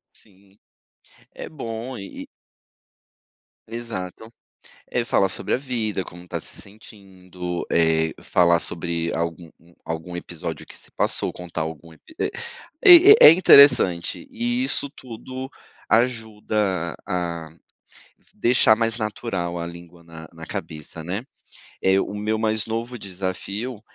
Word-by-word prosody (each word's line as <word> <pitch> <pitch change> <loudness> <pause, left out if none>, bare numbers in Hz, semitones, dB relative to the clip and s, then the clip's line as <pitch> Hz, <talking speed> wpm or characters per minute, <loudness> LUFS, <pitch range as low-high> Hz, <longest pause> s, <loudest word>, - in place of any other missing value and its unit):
Sim. 100 0 -19 0.8
É - - -7
bom 120 -3 -6
e 100 -1 -8
e - - -16 1.4
Exato. 110 -2 -6 0.6
É 120 -1 -1
falar 95 -5 +2
sobre - - -3
a - - +3
vida, 115 -8 -3
como 85 +1 -12
está 85 -1 -5
se - - -9
sentindo, 95 -4 -8
eh, 80 -1 +2
falar 85 -1 +3
sobre 85 0 -1
algum 85 0 -4
um 85 +1 -23
algum 80 +2 -5
episódio 85 -2 -6
que - - -11
se - - -10
passou, - - 0
contar 90 -3 -6
algum 80 +1 -7
ep - - -22 0.2
e - - -1 0.9
É - - +11
é - - +12
interessante. 140 - +5
E 240 +1 -1
isso 140 - 0
tudo 130 +2 -8 0.4
ajuda 105 -7 0
a 85 -3 -3 0.9
deixar 120 -2 +4
mais 115 +1 0
natural 95 -5 -3
a 85 - -4
língua 85 0 -12
na 80 -1 -12
na 80 -1 -11
cabeça, 80 +1 -7
né. 95 +7 -4 0.6
Eh, 95 +1 +3
o - - -3
meu 105 +1 -1
mais 110 0 0
novo 115 +2 -4
desafio 100 +5 -5
95 Hz, 130 wpm, -23 LUFS, 85-115 Hz, 1.4 s, é